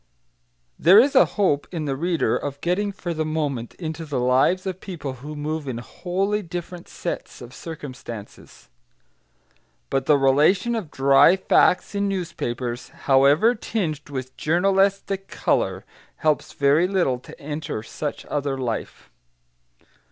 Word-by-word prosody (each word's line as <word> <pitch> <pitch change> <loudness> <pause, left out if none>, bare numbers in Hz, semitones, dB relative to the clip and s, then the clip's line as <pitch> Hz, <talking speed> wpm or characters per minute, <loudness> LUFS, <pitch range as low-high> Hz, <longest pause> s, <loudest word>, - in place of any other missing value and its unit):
There 180 +6 +7
is 270 +4 +4
a - - +7
hope, 165 -8 +2
in 165 -4 -3
the 135 -2 -1
reader, 170 +3 0
of 140 -1 -4
getting 200 +4 0
for 180 -3 -5
the 160 -1 -1
moment 145 -7 -3
into 160 -1 -5
the 145 -4 -3
lives 130 +10 +2
of 185 -1 -4
people 155 -9 -6
who 150 +2 -7
move 150 0 -4
in 125 -3 -3
wholly 190 - -2
different 175 -1 -7
sets - - -5
of 120 0 -11
circumstances. 130 -9 -9 1.2
But 135 -1 0
the 150 - +6
relation 150 - +3
of 215 -9 -3
dry 140 +5 +5
facts 185 0 +3
in 200 0 0
newspapers, 125 -10 -3 0.2
however 140 - +5
tinged 165 - -3
with 130 -2 -6
journalistic 195 +3 +1
colour, - - -1 0.3
helps 155 -2 0
very 145 +5 +3
little 175 -10 +1
to - - -14
enter 145 -6 -5
such 145 +5 -5
other 140 -2 -2
life. 120 -4 -5
155 Hz, 135 wpm, -23 LUFS, 135-185 Hz, 1.2 s, There